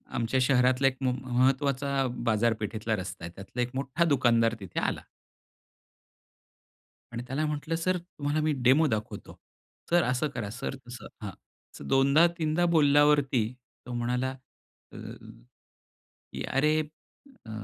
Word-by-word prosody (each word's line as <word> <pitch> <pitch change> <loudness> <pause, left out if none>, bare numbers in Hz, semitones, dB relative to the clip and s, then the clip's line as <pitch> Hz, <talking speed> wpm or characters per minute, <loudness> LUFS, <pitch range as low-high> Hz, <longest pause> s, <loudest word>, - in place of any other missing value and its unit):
आमच्या 120 +2 0
शहरातला 130 0 +3
एक 135 -1 0
म 130 -1 +2
महत्वाचा 135 +2 +1 0.2
बाजारपेठेतला 110 -1 0
रस्ता 95 -3 -7
आहे. 85 - -7
त्यातला 100 +6 -5
एक 120 0 -1
मोठा 135 +4 0
दुकानदार 120 -6 +3
तिथे 95 -4 -4
आला. - - -1 2.1
आणि 120 0 -4
त्याला 135 +5 -2
म्हटलं, 150 +2 -3
"सर, 185 +3 0
तुम्हाला 155 -4 -3
मी 155 0 +2
डेमो 135 +6 +5
दाखवतो. 110 -3 -4 0.5
सर, 175 0 +4
असं 125 +5 0
करा, 105 -5 -4
सर, 125 +4 -5
तसं." 120 -2 -9 0.2
हां. 105 - -4 0.4
असं - - -9
दोनदा-तीनदा 155 +5 +3
बोलल्यावरती 145 -4 +4 0.4
तो 125 - -6
म्हणाला, 125 +2 -1 0.6
अ, - - -10 1.4
की - - -4
अरे, 150 +3 +2 0.7
अ, - - -9
130 Hz, 125 wpm, -28 LUFS, 120-145 Hz, 2.1 s, डेमो